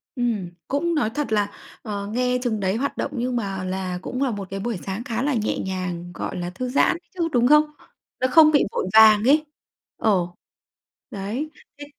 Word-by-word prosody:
Ừm, 230 Hz, -8 st, -1 dB, 0.2 s
cũng 330 Hz, +5 st, 0 dB
nói 290 Hz, -8 st, +1 dB
thật 285 Hz, 0 st, -3 dB
là, 205 Hz, -1 st, +1 dB, 0.3 s
ờ, 200 Hz, -3 st, -4 dB
nghe 250 Hz, +3 st, 0 dB
chừng 220 Hz, -3 st, -1 dB
đấy 190 Hz, 0 st, 0 dB
hoạt 275 Hz, +5 st, -2 dB
động, -, -, -2 dB
nhưng 245 Hz, +1 st, -1 dB
mà 195 Hz, -5 st, -2 dB
là 185 Hz, -1 st, -3 dB
cũng 255 Hz, +7 st, -4 dB
là 260 Hz, -, +1 dB
một 200 Hz, -2 st, -5 dB
cái 195 Hz, -, -3 dB
buổi 225 Hz, +1 st, -2 dB
sáng 195 Hz, +4 st, -4 dB
khá 230 Hz, -1 st, -3 dB
là 290 Hz, -, +1 dB
nhẹ 220 Hz, -3 st, -1 dB
nhàng, 180 Hz, -2 st, -4 dB
gọi 180 Hz, -, -5 dB
là, 175 Hz, 0 st, -3 dB
thư 250 Hz, +8 st, -4 dB
giãn 265 Hz, -, +3 dB
ấy 335 Hz, -, -8 dB
chứ, 345 Hz, -3 st, -1 dB
đúng 245 Hz, -1 st, +3 dB
không? 300 Hz, +2 st, +7 dB, 0.6 s
Nó 255 Hz, -, +2 dB
không 310 Hz, 0 st, +8 dB
bị 290 Hz, -, +4 dB
vội -, -, -2 dB
vàng 215 Hz, -1 st, +8 dB
ấy 300 Hz, +5 st, +4 dB, 0.5 s
ờ, 190 Hz, -6 st, +2 dB, 0.8 s
đấy. 215 Hz, +10 st, -4 dB, 0.3 s
Thế 290 Hz, -, -8 dB
220 Hz, 205 wpm, -23 LUFS, 195-255 Hz, 0.8 s, không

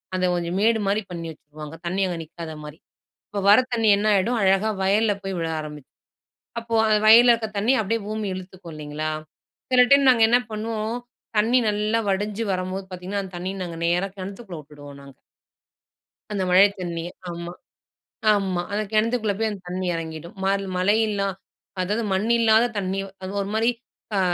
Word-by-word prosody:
அந்த 185 Hz, 0 st, +1 dB
கொஞ்சம் 175 Hz, +1 st, -2 dB
மேடுமாரி, 215 Hz, -2 st, +2 dB
பண்ணி 170 Hz, -1 st, -5 dB
வச்சுருவாங்க. 150 Hz, 0 st, -11 dB
தண்ணீ 185 Hz, +3 st, -1 dB
அங்க 175 Hz, -, -3 dB
நிக்காதமாரி. 155 Hz, -2 st, -9 dB, 0.5 s
இப்போ 200 Hz, -1 st, -3 dB
வர 210 Hz, -, +8 dB
தண்ணீ 225 Hz, -2 st, +1 dB
என்ன 210 Hz, +1 st, 0 dB
ஆயிடும், 230 Hz, +5 st, +1 dB
அழகா 195 Hz, +3 st, +3 dB
வயல்ல 205 Hz, +2 st, +3 dB
போய் 195 Hz, -1 st, -3 dB
விழ 165 Hz, -, -1 dB
ஆரம்பிச் 150 Hz, -2 st, -9 dB, 0.7 s
அப்போ 230 Hz, 0 st, -4 dB
அந்த 215 Hz, -1 st, +4 dB
வயல்ல 235 Hz, +2 st, +8 dB
இருக்க 225 Hz, -1 st, -3 dB
தண்ணீ, 220 Hz, +6 st, +3 dB
அப்பிடியே 225 Hz, +2 st, -1 dB
பூமி 215 Hz, 0 st, -3 dB
இழுத்துக்கும், 185 Hz, -2 st, -9 dB
இல்லேங்களா! 155 Hz, +1 st, -4 dB, 0.6 s
சில 250 Hz, -1 st, +6 dB
டைம் 280 Hz, -1 st, +6 dB
நாங்க 230 Hz, -3 st, +3 dB
என்ன 245 Hz, +2 st, +5 dB
பண்ணுவோம், 220 Hz, +1 st, -3 dB, 0.4 s
தண்ணீ 235 Hz, +4 st, +4 dB
நல்லா 210 Hz, +2 st, +1 dB
வடிஞ்சி 205 Hz, +3 st, -1 dB
வரம்போது, 185 Hz, +1 st, -3 dB
பார்த்தீங்கன்னா 185 Hz, +2 st, -4 dB
அந்த 190 Hz, -1 st, -10 dB
தண்ணீய 185 Hz, +2 st, -4 dB
நாங்க 170 Hz, -2 st, -7 dB
நேரா 180 Hz, +3 st, +1 dB
கிணத்துக்குள்ள 195 Hz, -1 st, -7 dB
விட்டுடுவோம் 145 Hz, -1 st, -13 dB
நாங்க. 140 Hz, -1 st, -14 dB, 1.2 s
அந்த 200 Hz, -2 st, -1 dB
மழை 190 Hz, +3 st, +7 dB
தண்ணீய. 170 Hz, -1 st, -4 dB, 0.2 s
ஆமா. 170 Hz, 0 st, -6 dB, 0.8 s
ஆமா. 190 Hz, -3 st, 0 dB
அந்த 210 Hz, +1 st, 0 dB
கிணத்துக்குள்ள 220 Hz, -1 st, +1 dB
போய் 225 Hz, 0 st, +1 dB
அந்த 200 Hz, -2 st, -8 dB
தண்ணீ 185 Hz, +1 st, -3 dB
இறங்கிடும். 160 Hz, 0 st, -7 dB
மல் 195 Hz, 0 st, +1 dB
மழை 205 Hz, +4 st, +3 dB
இல்லா 200 Hz, -1 st, -1 dB, 0.5 s
அதாவது 210 Hz, +5 st, -1 dB
மண் 190 Hz, +4 st, 0 dB
இல்லாத 225 Hz, 0 st, +5 dB
தண்ணீ 190 Hz, 0 st, -1 dB, 0.2 s
அது 185 Hz, -, -5 dB
ஒருமாரி 220 Hz, +3 st, 0 dB, 0.5 s
அ -, -, +3 dB
195 Hz, 160 wpm, -23 LUFS, 175-215 Hz, 1.2 s, வர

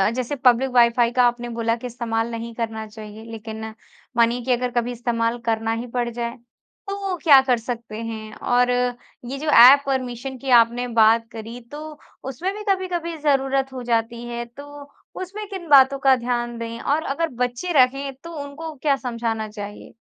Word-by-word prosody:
जैसे 255 Hz, +3 st, -2 dB
public 255 Hz, 0 st, +3 dB
wifi 235 Hz, 0 st, +4 dB
का 250 Hz, 0 st, +3 dB
आपने 240 Hz, 0 st, -3 dB
बोला 230 Hz, 0 st, 0 dB
कि 245 Hz, +1 st, -7 dB
इस्तेमाल 230 Hz, -1 st, -2 dB
नहीं 230 Hz, 0 st, -6 dB
करना 220 Hz, -2 st, -4 dB
चाहिए। 215 Hz, 0 st, -10 dB
लेकिन 220 Hz, 0 st, -7 dB, 0.5 s
मानिए 235 Hz, +1 st, +3 dB
कि 260 Hz, -, 0 dB
अगर 250 Hz, 0 st, 0 dB
कभी 240 Hz, 0 st, -1 dB
इस्तेमाल 235 Hz, -1 st, -1 dB
करना 225 Hz, -1 st, 0 dB
ही 235 Hz, +2 st, -4 dB
पड़ 245 Hz, -1 st, 0 dB
जाए, 235 Hz, 0 st, -4 dB, 0.5 s
तो 395 Hz, -2 st, -3 dB
क्या 285 Hz, -4 st, +8 dB
कर 250 Hz, -, +4 dB
सकते 230 Hz, -2 st, -6 dB
हैं? 220 Hz, -1 st, -6 dB
और 245 Hz, 0 st, +2 dB, 0.6 s
ये 265 Hz, +3 st, -5 dB
जो 305 Hz, +2 st, -6 dB
एप 270 Hz, +3 st, +9 dB
परमिशन 260 Hz, -1 st, -3 dB
की 270 Hz, +1 st, -6 dB
आपने 240 Hz, +2 st, -2 dB
बात 230 Hz, 0 st, +4 dB
करी 225 Hz, +2 st, -8 dB
तो 300 Hz, +1 st, -8 dB, 0.2 s
उसमें 275 Hz, +9 st, -3 dB
भी 425 Hz, -, -7 dB
कभी-कभी 355 Hz, -3 st, -2 dB
ज़रूरत 270 Hz, -2 st, +1 dB
हो 255 Hz, -, -6 dB
जाती 235 Hz, 0 st, -1 dB
है 235 Hz, 0 st, -4 dB
तो 285 Hz, +4 st, -12 dB, 0.3 s
उसमें 405 Hz, +3 st, -6 dB
किन 375 Hz, -4 st, -7 dB
बातों 275 Hz, -1 st, +6 dB
का 270 Hz, -1 st, +5 dB
ध्यान 240 Hz, -1 st, -2 dB
दें? 230 Hz, 0 st, -6 dB
और 300 Hz, +3 st, 0 dB
अगर 330 Hz, +4 st, -1 dB, 0.2 s
बच्चे 250 Hz, +9 st, -3 dB
रहें 275 Hz, +1 st, +3 dB
तो 335 Hz, -, -8 dB
उनको 310 Hz, +3 st, -7 dB
क्या 285 Hz, -2 st, +3 dB
समझाना 230 Hz, -4 st, -3 dB
चाहिए? 205 Hz, -1 st, -9 dB
245 Hz, 175 wpm, -22 LUFS, 230-275 Hz, 0.6 s, एप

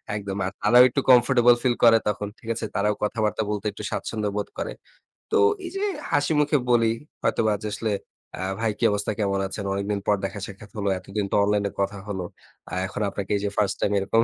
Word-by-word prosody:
একদম। 100 Hz, -1 st, -4 dB
আ -, -, 0 dB, 0.2 s
তারাও 120 Hz, +4 st, +8 dB
একটু 135 Hz, -, 0 dB
কমফোর্টেবল 120 Hz, -1 st, +6 dB
ফিল 125 Hz, -2 st, +2 dB
করে 115 Hz, -1 st, +8 dB
তখন। 105 Hz, 0 st, -2 dB
ঠিক 115 Hz, -, -10 dB
আছে? 115 Hz, -, -3 dB
তারাও 105 Hz, +1 st, +2 dB
কথাবার্তা 110 Hz, 0 st, 0 dB
বলতে 105 Hz, 0 st, -3 dB
একটু 105 Hz, -, -9 dB
স্বাচ্ছন্দ্য 105 Hz, -2 st, -2 dB
বোধ 105 Hz, -, -2 dB
করে। -, -, -3 dB, 0.6 s
তো -, -, +3 dB, 0.3 s
এই 345 Hz, -, -5 dB
যে 390 Hz, -, -2 dB, 0.3 s
হাসিমুখে 150 Hz, +1 st, +2 dB
বলি 115 Hz, -2 st, +4 dB, 0.3 s
হয়তোবা 110 Hz, -1 st, +2 dB
যে, 105 Hz, -, -3 dB
আসলে 110 Hz, +1 st, -2 dB, 0.5 s
আ -, -, -4 dB, 0.2 s
"ভাই 115 Hz, -1 st, +1 dB
কি -, -, 0 dB
অবস্থা, 100 Hz, 0 st, -1 dB
কেমন 100 Hz, -2 st, 0 dB
আছেন? 100 Hz, +1 st, -6 dB
অনেকদিন 100 Hz, +1 st, -1 dB
পর 105 Hz, -, +4 dB
দেখা-সাক্ষাত 100 Hz, +1 st, -6 dB
হলো। 100 Hz, -2 st, -1 dB
এতদিন 100 Hz, +2 st, -4 dB
তো -, -, +3 dB
অনলাইনে 100 Hz, 0 st, +1 dB
কথা 100 Hz, +1 st, -1 dB
হলো। 95 Hz, -3 st, -3 dB, 0.5 s
আ -, -, -2 dB
এখন 95 Hz, -, -6 dB
আপনাকে 100 Hz, 0 st, -5 dB
এই -, -, -2 dB
যে, -, -, +1 dB
1st 100 Hz, -2 st, +1 dB
টাইম 105 Hz, -, +1 dB
এরকম 105 Hz, +4 st, +2 dB
105 Hz, 200 wpm, -25 LUFS, 100-115 Hz, 0.6 s, তারাও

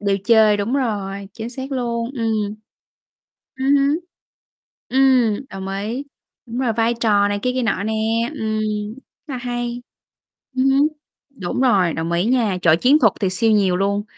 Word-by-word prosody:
đều 200 Hz, -1 st, +1 dB
chơi, 220 Hz, -2 st, +5 dB
đúng 205 Hz, +5 st, -1 dB
rồi, 200 Hz, -6 st, -2 dB
chính 230 Hz, +1 st, -6 dB
xác 265 Hz, +2 st, -6 dB
luôn, 235 Hz, -2 st, -2 dB
ừm. 220 Hz, -4 st, -1 dB, 1.0 s
Ừm 270 Hz, +2 st, +2 dB
hứm. 280 Hz, +3 st, +2 dB, 0.9 s
Ừm, 260 Hz, -3 st, +3 dB
đồng 190 Hz, 0 st, -7 dB
ý. 210 Hz, +7 st, -3 dB, 0.4 s
Đúng 235 Hz, 0 st, -6 dB
rồi, 245 Hz, -4 st, +1 dB
vai 230 Hz, +1 st, +1 dB
trò 210 Hz, -3 st, +2 dB
này 205 Hz, 0 st, -1 dB
kia 250 Hz, -, +1 dB
kia 255 Hz, -, 0 dB
nọ 200 Hz, -4 st, 0 dB
nè. 220 Hz, +2 st, -1 dB, 0.4 s
Ừm 220 Hz, -4 st, -2 dB, 0.7 s
là 270 Hz, -4 st, -4 dB
hay. 240 Hz, 0 st, -4 dB, 0.7 s
Ừm 255 Hz, 0 st, +2 dB
hứm, 275 Hz, +2 st, +4 dB, 0.4 s
đúng 225 Hz, -5 st, -4 dB
rồi, 195 Hz, -10 st, +3 dB
đồng 165 Hz, +1 st, -3 dB
ý 170 Hz, +2 st, +1 dB
nha, 230 Hz, -6 st, +1 dB
trời, 165 Hz, -2 st, +5 dB
chiến 275 Hz, -, +4 dB
thuật 220 Hz, -5 st, +4 dB
thì 195 Hz, -, +1 dB
siêu 220 Hz, +5 st, +1 dB
nhiều 195 Hz, -4 st, +3 dB
luôn. 200 Hz, +1 st, 0 dB
225 Hz, 165 wpm, -20 LUFS, 200-255 Hz, 1.0 s, chơi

